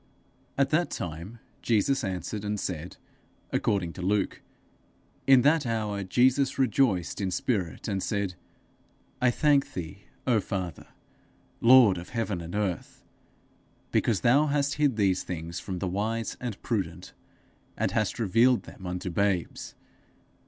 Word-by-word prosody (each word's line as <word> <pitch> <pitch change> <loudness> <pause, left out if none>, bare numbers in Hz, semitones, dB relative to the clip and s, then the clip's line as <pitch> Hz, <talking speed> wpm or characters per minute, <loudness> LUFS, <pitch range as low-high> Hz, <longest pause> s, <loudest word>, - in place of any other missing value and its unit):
_ - - -36 0.5
At 140 0 +2
that 170 +3 +2
time 85 +7 -6 0.2
Jesus 120 +4 +1
answered 95 +2 -4
and 105 0 -2
said, 90 -2 -5 0.5
according 90 -4 0
to 95 - -8
Luke, 100 +1 0 0.9
In 135 -2 +7
that 150 +1 +4
hour 105 -3 -2
Jesus 130 +7 +2
rejoiced 115 -9 +1
in 95 - 0
spirit, 90 - -2
and 95 -1 -1
said, 100 -3 -1 0.9
'I 125 - +5
thank 145 +2 +2
thee, 95 +3 -7 0.2
O 120 -4 +3
Father, 95 -6 -4 0.7
Lord 115 -6 +7
of 85 - -10
heaven 110 -7 -2
and 85 +3 -7
earth, 100 -5 -3 0.9
because 105 -7 +1
thou 140 +8 +4
hast 140 -1 +1
hid 140 -5 +3
these 95 -3 +2
things 85 -1 -5
from 95 -2 -5
the 95 - -2
wise 110 +5 -2
and 120 -5 -4
prudent, 90 -7 -3 0.6
and - - 0
hast 110 -3 0
revealed 115 +3 +3
them 95 - -10
unto 90 0 -4
babes. 95 -1 -1
105 Hz, 140 wpm, -27 LUFS, 90-125 Hz, 0.9 s, In